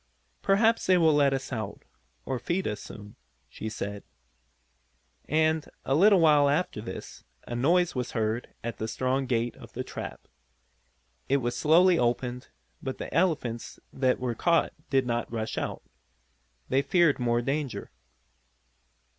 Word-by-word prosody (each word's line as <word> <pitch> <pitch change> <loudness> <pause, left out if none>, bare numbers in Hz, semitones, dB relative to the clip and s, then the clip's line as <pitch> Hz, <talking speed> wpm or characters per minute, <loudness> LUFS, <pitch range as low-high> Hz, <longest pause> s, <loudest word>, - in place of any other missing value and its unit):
"Perhaps 220 +3 +3
they 185 -1 +5
will 160 -3 +5
let 145 -2 +4
us 135 0 -3
out, 110 -3 -5 0.4
or 130 -2 -2
feed 175 +9 -1
us 105 -1 -3
soon," 105 -1 -11 0.3
she 110 - -6
said. 100 -2 -5 1.3
And, 155 0 +2 0.2
a 135 - +1
little 195 +6 +6
while 150 -3 +5
after 145 -7 0
this, 95 -4 -8 0.2
a 120 - -4
noise 170 +8 +3
was 125 -2 -3
heard 110 +1 -1
at 120 0 -5
the 110 - -2
strong 130 +3 -1
gate 120 -1 0
of - - -13
the - - -3
trap. - - -8 1.0
It 140 - +4
was 120 -2 -2
slowly 170 +3 +5
opened, 125 +1 -1 0.3
but 130 -1 -4
the - - -7
elephants 150 -9 0
that 130 -1 +1
were 125 -2 -1
caught 170 +7 +2 0.2
did 135 -2 +2
not 120 -1 -2
rush 110 -1 -3
out. - - -4 0.8
They 135 +1 +2
feared 170 -2 +3
more 120 -1 +1
danger. 140 +1 -3
130 Hz, 145 wpm, -28 LUFS, 120-160 Hz, 1.3 s, little